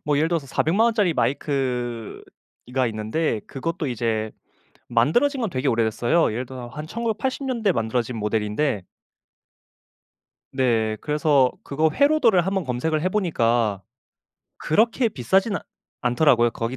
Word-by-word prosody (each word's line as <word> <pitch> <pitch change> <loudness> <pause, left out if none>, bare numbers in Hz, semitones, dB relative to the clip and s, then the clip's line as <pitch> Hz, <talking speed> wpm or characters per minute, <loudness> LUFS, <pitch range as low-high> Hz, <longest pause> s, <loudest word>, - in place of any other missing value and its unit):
뭐 150 -1 +1
예를 155 +3 +2
들어서 165 -5 -1
400 160 +6 0
만 225 +3 +4
원짜리 215 -7 +2
마이크 125 -6 -2 0.4
이 125 - -14
가 130 -1 +2
있는데 110 +3 -2
그것도 155 +2 -3
이제 110 -3 -1 0.6
만들어진 160 - +2
건 225 -5 -1
되게 135 -2 -1
오래됐어요. 115 +6 +1
예를 125 +3 -3
들어서 125 -1 -8
한 150 +5 -7
1980 235 - -3
년대에 230 -7 +1
만들어진 115 -1 -2
모델인데 105 +2 -1 1.7
네. 115 -5 +1
그래서 150 -3 +2
그거 155 +3 0
회로도를 270 - +4
한번 190 -1 -1
검색을 150 +5 -1
해 185 - +2
보니까 120 - +1 0.7
그렇게 230 +8 +2
비싸진 195 - +1
않 - - -7 0.4
않더라고요 120 -1 +3
거기 115 +3 -4
135 Hz, 305 characters per minute, -23 LUFS, 120-180 Hz, 1.7 s, 만